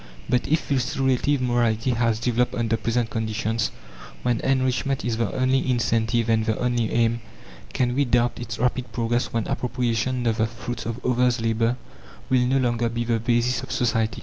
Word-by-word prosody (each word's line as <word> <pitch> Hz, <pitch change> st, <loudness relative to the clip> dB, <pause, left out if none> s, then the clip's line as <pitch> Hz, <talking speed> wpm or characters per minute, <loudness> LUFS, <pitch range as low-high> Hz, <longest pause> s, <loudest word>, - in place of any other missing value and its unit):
But 125 Hz, -, +1 dB
if 155 Hz, +2 st, 0 dB
this 135 Hz, +1 st, -1 dB
relative 135 Hz, +1 st, +1 dB
morality 120 Hz, -1 st, +1 dB
has 115 Hz, -2 st, +1 dB
developed 120 Hz, +1 st, 0 dB
under 115 Hz, -1 st, 0 dB
present 115 Hz, 0 st, -1 dB
conditions, 110 Hz, -1 st, -1 dB, 0.5 s
when 120 Hz, -2 st, +1 dB
enrichment 130 Hz, 0 st, 0 dB
is 115 Hz, -2 st, -1 dB
the 115 Hz, -, 0 dB
only 130 Hz, +1 st, +1 dB
incentive 115 Hz, -1 st, +1 dB
and 110 Hz, -1 st, +2 dB
the 110 Hz, -1 st, 0 dB
only 120 Hz, -2 st, 0 dB
aim, 115 Hz, 0 st, +1 dB, 0.5 s
can 125 Hz, -1 st, 0 dB
we 140 Hz, +3 st, +2 dB
doubt 120 Hz, -1 st, +1 dB
its 115 Hz, -3 st, -5 dB
rapid 125 Hz, +1 st, -1 dB
progress 120 Hz, +1 st, -1 dB
when 115 Hz, -2 st, -1 dB
appropriation 125 Hz, 0 st, -1 dB
of 115 Hz, -2 st, +1 dB
the 110 Hz, -2 st, +2 dB
fruits 115 Hz, 0 st, -6 dB
of 115 Hz, +2 st, -5 dB
others' 125 Hz, -1 st, +2 dB
labour 115 Hz, +2 st, +1 dB, 0.5 s
will 125 Hz, -1 st, +4 dB
no 135 Hz, +2 st, +2 dB
longer 120 Hz, -2 st, +1 dB
be 120 Hz, +1 st, -2 dB
the 115 Hz, -1 st, 0 dB
basis 120 Hz, +2 st, +1 dB
of -, -, -8 dB
society? 115 Hz, -2 st, 0 dB
120 Hz, 175 wpm, -24 LUFS, 115-125 Hz, 0.5 s, will